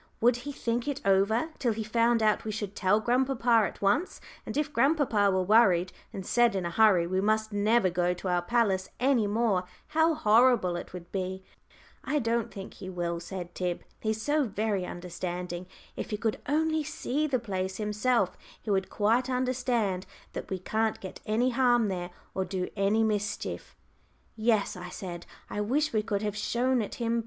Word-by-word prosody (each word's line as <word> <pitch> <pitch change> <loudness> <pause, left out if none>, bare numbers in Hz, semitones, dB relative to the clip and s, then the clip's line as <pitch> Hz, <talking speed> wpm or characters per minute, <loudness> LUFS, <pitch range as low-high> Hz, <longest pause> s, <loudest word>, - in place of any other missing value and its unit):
Would 240 +1 +4
he 285 +4 -6
"think 240 -1 -2
it 285 -1 -2
over" 200 +9 +3
till 240 -4 +1
he 220 +1 -3
found 230 +1 +2
out 215 -1 +2
we 220 - -4
should 205 -1 -5
tell 195 +2 +3
grandpapa 240 -2 +2
at - - -10
once; 250 - +1 0.3
and - - -4
if 300 0 -1
grandpapa 250 -6 +3
were 190 -1 +1
worried, 185 -3 +4 0.2
and 190 - -6
said 240 -1 +3
in 185 -2 -1
a 170 - -2
hurry 195 -3 +5
we 185 +2 0
must 215 +1 +1
never 210 +1 +3
go 175 0 +1
to 180 - -6
our 180 -1 +2
palace 190 -2 +1
any 250 -4 +3
more, 205 -3 +1 0.2
how 320 +1 +3
horrible 220 -6 +4
it 175 - -6
would 175 -1 -9
be! 190 0 -3 0.6
"I 300 - 0
don't 230 -3 0
think 195 -1 -8
he 185 - -8
will," 170 -2 -2
said 175 0 -7
Tib. 180 -1 -3 0.2
"He's 220 0 -1
so 290 +5 +1
very 205 -3 -1
understanding. 175 0 -5 0.3
If - - -5
he 210 - -2
could 220 0 -1
only 315 +1 +1
see 295 0 -2
the 270 -3 +1
place 190 -5 -3
himself, 210 -1 +1 0.2
he 215 - -4
would 190 -1 +1
quite 230 +5 +1
understand 250 -7 0 0.3
that - - -6
we 190 - -2
can't 220 +4 -1
get 190 - -9
any 235 +4 +2
harm 240 -3 +3
there, 175 -2 -3 0.2
or 190 - 0
do 185 -1 -3
any 205 +2 +2
mischief." 210 -1 -2 0.6
"Yes," 215 -2 +1
I 180 0 -7
said, 175 -2 -7 0.2
"I 205 - -3
wish 285 +8 0
we 215 - +2
could 210 -1 -2
have 210 -1 -2
shown 240 +4 +1
it 205 - -5
him. 235 -1 0
215 Hz, 185 wpm, -29 LUFS, 190-240 Hz, 0.6 s, hurry